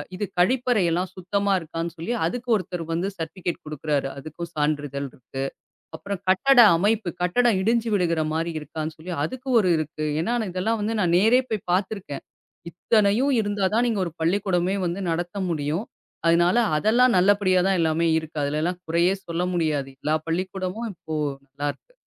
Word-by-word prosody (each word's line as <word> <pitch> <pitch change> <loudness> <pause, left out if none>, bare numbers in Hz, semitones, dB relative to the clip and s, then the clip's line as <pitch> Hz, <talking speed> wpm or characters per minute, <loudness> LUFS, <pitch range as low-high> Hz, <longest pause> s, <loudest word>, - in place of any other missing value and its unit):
இது 205 - -2
கழிப்பறை 245 +3 +3
எல்லாம் 180 +2 0
சுத்தமா 200 +2 -1
இருக்கான்னு 165 0 -5
சொல்லி 170 +9 -3
அதுக்கு 245 0 -5
ஒருத்தர் 180 -3 -3
வந்து 175 +4 -1
சர்டிபிகேட் 170 +2 -4
கொடுக்கிறாரு. 150 -2 -1
அதுக்கும் 155 +4 -7
சான்றிதழ் 145 -2 -1
இருக்கு. 135 +2 -7 0.5
அப்பறம் 200 +2 -5
கட்டட 245 +8 +5 0.2
அமைப்பு! 205 +1 +1
கட்டடம் 225 +3 +3
இடிஞ்சு 230 +2 +1
விழுகிற 170 -4 +1
மாரி 165 +1 -1
இருக்கான்னு 155 +1 -5
சொல்லி, 175 +3 -6
அதுக்கு 260 - -6
ஒரு 185 - +1
இருக்கு. 155 0 -3 0.2
ஏனா 235 +8 0 0.2
இதெல்லாம் 215 +5 -1
வந்து 220 +2 -1
நான் 175 -2 +2
நேரே 230 +6 +5
போய்ப் 215 -3 -3
பாத்திருக்கேன். 190 -5 -2 0.5
இத்தனையும் 215 - +2
இருந்தாதான் 205 +2 +1
நீங்க 225 -4 0
ஒரு - - -7
பள்ளிக்கூடமே 185 +1 +1
வந்து 175 +3 -2
நடத்த 175 +4 -3
முடியும். 155 +6 -2 0.4
அதுனால, 170 +5 +4 0.2
அதெல்லாம் 235 +7 +4
நல்லபடியா 190 0 +4
தான் 195 -1 +2
எல்லாமே 165 0 +2
இருக்கு. 160 -1 -6
அதுல 145 +2 -1
எல்லாம் 175 +2 -1
குறையே 170 +3 +3
சொல்ல 170 +1 -1
முடியாது. 155 -5 0
எல்லா 155 +1 +1
பள்ளிக்கூடமும் 185 +5 -3
இப்போ 160 -2 -9 0.4
நல்லாருக்கு. 145 - -5
180 Hz, 150 wpm, -24 LUFS, 160-205 Hz, 0.5 s, கட்டட